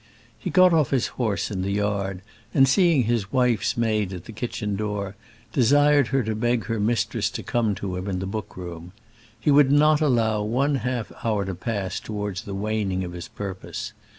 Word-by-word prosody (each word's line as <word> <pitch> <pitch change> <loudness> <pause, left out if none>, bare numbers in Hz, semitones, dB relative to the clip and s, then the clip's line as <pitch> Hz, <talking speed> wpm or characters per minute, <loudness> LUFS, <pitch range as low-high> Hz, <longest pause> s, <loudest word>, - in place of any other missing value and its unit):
He - - -4
got 185 -2 +6
off 155 -5 +3
his 135 -4 +1 0.2
horse 105 -6 0
in 95 -2 -2
the 100 +1 -1
yard, 100 -2 -1 0.3
and 135 0 +6
seeing 165 -1 +4
his 110 -4 -1
wife's 120 -5 +1
maid 110 -4 +1
at 90 -1 -8
the - - -9
kitchen 105 -2 -3
door, 105 -1 -3 0.4
desired 145 +2 +4
her 135 0 +1
to 110 0 -2
beg 120 +1 0
her 115 -2 -2
mistress 110 0 0
to - - -6
come 115 -4 0
to 95 -1 -4
him 90 +2 -4
in 95 -2 -1
the 95 - -3
book 105 +1 -5
room. 85 -1 -8 0.5
He 145 - +2
would 140 -1 +6
not 150 +1 +5
allow 115 -7 +2
one 135 +7 +1
half 125 -3 -3
hour 105 -3 0
to 95 - -3
pass 95 0 -3
towards 105 -3 -4
the 100 - -5
waning 100 -2 -1
of 90 -1 -6
his 90 -1 -7
purpose. 95 -2 -6
110 Hz, 195 wpm, -24 LUFS, 100-125 Hz, 0.5 s, got